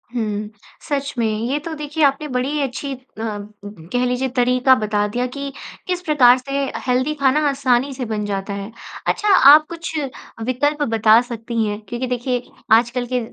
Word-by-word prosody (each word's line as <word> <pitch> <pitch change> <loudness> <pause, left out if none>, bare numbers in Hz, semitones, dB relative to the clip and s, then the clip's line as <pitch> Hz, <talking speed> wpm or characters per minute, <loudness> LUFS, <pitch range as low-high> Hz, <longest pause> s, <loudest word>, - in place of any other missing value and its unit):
हुँ, 210 -2 -2 0.4
सच 280 -1 -2
में। 230 - +1
ये 230 +6 -1
तो 320 +2 -6
देखिए, 300 +1 -2
आपने 280 +2 +2
बड़ी 265 +3 -1
अच्छी 275 +1 -3
अ, - - -8 0.2
कह 205 0 -4
लीजिए, 250 +1 0
तरीका 250 +1 +3
बता 210 -1 +1
दिया 245 +4 -2
कि 280 +2 -6 0.4
किस 360 -1 -1
प्रकार 260 -7 +5
से 275 +1 -2
अ, - - -6
हेल्दी 255 +4 +1
खाना 275 +2 +4
आसानी 270 0 +1
से 255 -1 -4
बन 215 -2 -3
जाता 200 0 -3
है। 200 +2 -6 0.4
अच्छा, 420 - 0
आप 305 -4 +8
कुछ 335 -1 -6 0.5
विकल्प 290 +4 0
बता 220 0 +5
सकती 235 -1 -3
हैं? 205 0 -3
क्योंकि 240 +2 -3
देखिए, 245 0 -2 0.3
आजकल 240 +2 +3
के 250 - +2
250 Hz, 170 wpm, -20 LUFS, 225-280 Hz, 0.5 s, आप